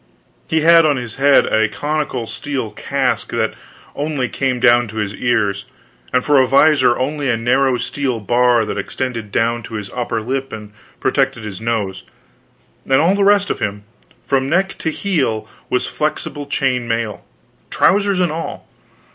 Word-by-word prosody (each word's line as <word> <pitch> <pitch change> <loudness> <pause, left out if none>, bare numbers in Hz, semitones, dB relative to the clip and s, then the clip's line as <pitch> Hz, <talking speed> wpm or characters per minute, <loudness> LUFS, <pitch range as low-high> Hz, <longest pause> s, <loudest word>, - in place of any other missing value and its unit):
He 160 0 +1
had 165 +1 +7
on 150 -3 +2
his 120 -2 -6
head 140 +1 +5
a 110 -1 +2
conical 145 -5 -2
steel 130 -2 -4
casque - - -1
that - - 0 0.4
only 145 -4 -2
came 130 -2 -1
down 120 -1 +4
to 110 - -11
his 105 -2 -2
ears, 105 -4 0 0.5
and 125 0 +1
for 145 -3 +5
visor 135 -2 +4
had - - -4
only 145 0 -2
a 115 - +2
narrow 130 +2 +2
steel 125 0 -2
bar 120 +1 +2
that 105 - -3
extended 115 -5 -4
down 115 +3 0
to 115 - -8
his 105 -2 -6
upper 120 -2 -2
lip 135 +4 -3
and 105 -1 -9 0.3
protected 130 -3 0
his 105 -2 -7
nose; 105 -5 -2 0.8
and 135 0 +2
all 170 +5 +3
the 200 0 +1
rest 200 0 +4
of - - -3
him, 105 0 -3 0.4
from 135 -1 0
neck 190 +4 +1
to - - -1
heel, 140 - -1 0.2
was 125 - 0
flexible 150 -1 -3
chain 130 -4 0
mail, 115 -2 -2 0.5
trousers 200 -1 +2
and 175 -3 +2
all. 165 +1 -6
125 Hz, 165 wpm, -18 LUFS, 115-145 Hz, 0.8 s, had